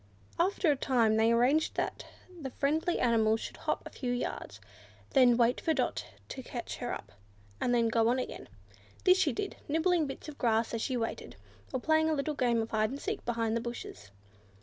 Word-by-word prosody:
After 355 -2 +3
a - - +2
time 240 -5 +2
they 225 +1 +4
arranged 255 +7 +3
that - - -3 0.3
the 270 - -4
friendly 310 +6 0
animal 225 -2 +3
should - - -7
hop - - -2
a - - -8
few 250 -2 -3
yards, 110 - -4 0.5
then 245 -3 +5
wait 240 0 +3
for 320 - +1
Dot - - -1 0.2
to 265 - -6
catch 245 -1 -6
her 245 -1 -3
up, - - -6 0.5
and 245 - +1
then 235 -1 +3
go 225 0 +2
on 245 +2 +3
again. 255 - -5 0.5
This 370 0 +6
she 375 - +3
did, 405 -2 -4
nibbling 325 +1 +2
bits 270 - -7
of 300 - -9
grass 225 -1 +1
as 230 - -1
she 255 +1 -1
waited, 225 -1 -4 0.4
or 260 - -1
playing 315 +3 +3
a 315 - +2
little 300 +2 -1
game 240 -4 +1
of 225 - -8
hide 215 -1 +2
and 275 +3 -5
seek 415 +5 -3
behind 230 -1 0
the 230 - 0
bushes. 235 - -7
245 Hz, 200 wpm, -31 LUFS, 230-305 Hz, 0.5 s, This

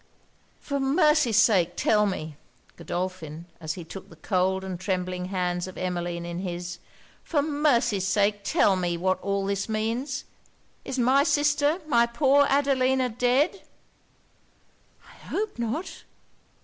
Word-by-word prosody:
'For 280 -1 -3
mercy's 275 - +3
sake 180 -6 +4
tell 210 -1 +3
me,' 155 -6 -4 0.4
Godolphin, 175 -3 -5
as 155 -2 -3
he 175 - -7
took 190 +4 -10
the 165 - -14
cold 190 +3 0
and 185 -2 -5
trembling 185 -1 -2
hands 180 -1 -2
of 185 - -10
Emmeline 175 -1 -3
in 170 0 -5
his 175 -1 -5 0.4
'for 290 -4 0
mercy's 240 -10 +1
sake 205 +1 +2
tell 200 0 +3
me 175 -2 -1
what 185 +2 0
all 200 0 -1
this 200 +2 -2
means? 230 +5 -2 0.6
Is 265 - -5
my 260 +3 +4
sister, 290 +2 +2
my 235 -6 +3
poor 275 +3 +3
Adelina 265 -2 +2
dead?' 250 - +1 1.5
'I - - -16
hope 425 - -3
not!' 235 +10 -4
205 Hz, 135 wpm, -26 LUFS, 180-270 Hz, 1.5 s, sake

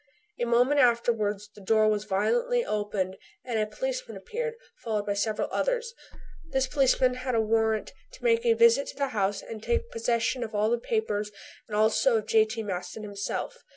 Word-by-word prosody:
A - - +1
moment 245 +5 +3
afterwards 230 -5 +2
the 205 - -14
door 215 +2 +3
was 210 -1 +1
violently 475 - +1
opened 205 -3 -2 0.3
and 235 -3 -1
a 215 - +1
policeman - - -4
appeared, 475 0 -4 0.3
followed 215 -3 -1
by 205 - 0
several 210 +1 -1
others. 485 -2 -1 0.6
This 265 -2 +1
policeman 260 -2 +3
had 255 0 -3
a - - +3
warrant 220 0 +1 0.2
to - - -14
make 465 -1 +3
a 470 -1 +4
visit 470 +2 +5
to - - -7
the 280 -1 -1
house 200 -3 -1
and 220 -2 -8
to - - -13
take 470 0 0
possession 245 - 0
of 220 -2 -6
all 215 +3 +2
papers 215 -2 -1 0.4
and 210 -2 -3
also 225 +3 +3
of 215 - -3
J.T. 220 +1 +2
Maston 185 +1 -5
himself. 205 - -4
225 Hz, 180 wpm, -27 LUFS, 210-290 Hz, 0.6 s, visit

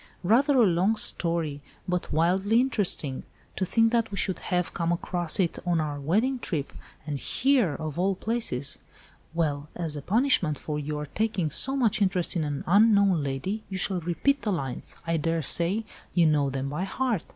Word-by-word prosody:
"Rather 265 +9 +3
a 240 - +6
long 185 +4 +2
story, 165 -8 0 0.3
but 180 -1 -2
wildly 190 +8 +2
interesting. 200 - 0 0.3
To 190 - -1
think 225 +4 +3
that 230 -1 +1
we 200 - -6
should 190 0 -1
have 180 -1 -1
come 170 0 -1
across 175 -1 -1
it 175 -3 0
on 175 -2 +1
our 150 -2 -3
wedding 220 - +1
trip, 150 -10 -3 0.3
and 145 -2 -3
here 250 - +2
of 155 +2 -5
all 190 +1 +1
places. 185 - -2 0.6
Well, 150 -3 -1
as 165 -4 -2
a 145 - -5
punishment 195 - +2
for 150 -1 -4
your 150 0 -4
taking 185 -1 -1
so 270 - +1
much 235 -6 +1
interest 185 -2 +1
in 165 - 0
an 145 -2 -3
unknown 200 -3 +4
lady 180 +11 -3
you 190 - -4
shall 185 0 +1
repeat 275 - 0
the 210 - -1
lines. 135 -9 -2
I 165 0 0
daresay 170 - +1 0.3
you 175 -2 +5
know 150 -3 +2
them 135 0 -3
by 155 +6 -3
heart." 230 -2 -1
175 Hz, 175 wpm, -26 LUFS, 155-215 Hz, 0.6 s, a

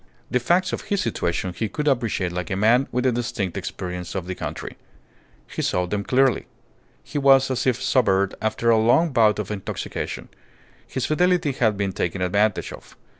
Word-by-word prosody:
The 125 - +2
facts 175 +9 +1
of - - -2
his 205 -2 -1
situation 90 -5 -2
he 110 +4 -3
could 150 -1 -3
appreciate 115 -9 0
like 90 -1 -4
a 95 - -1
man 115 +7 +3
with 125 +1 -1
a 130 - +4
distinct 115 -6 -2
experience 90 -1 -5
of 95 -3 -3
the 95 - -4
country. - - -6 0.7
He - - -4
saw 90 0 0
them 100 +3 -2
clearly. 130 +1 +2 0.6
He 145 - -4
was 135 -1 +5
as 130 0 -1
if 125 -2 +2
sobered 100 -7 +2
after 110 +2 +1
a 110 - +4
long 120 +10 +4
bout 110 -4 +4
of 105 -1 -4
intoxication. 100 -3 -5 0.6
His 130 - -3
fidelity 175 -1 +2
had 110 -6 +1
been 100 -1 -1
taken 90 +1 -2
advantage 100 +3 +1
of. - - -14
115 Hz, 180 wpm, -23 LUFS, 95-130 Hz, 0.7 s, was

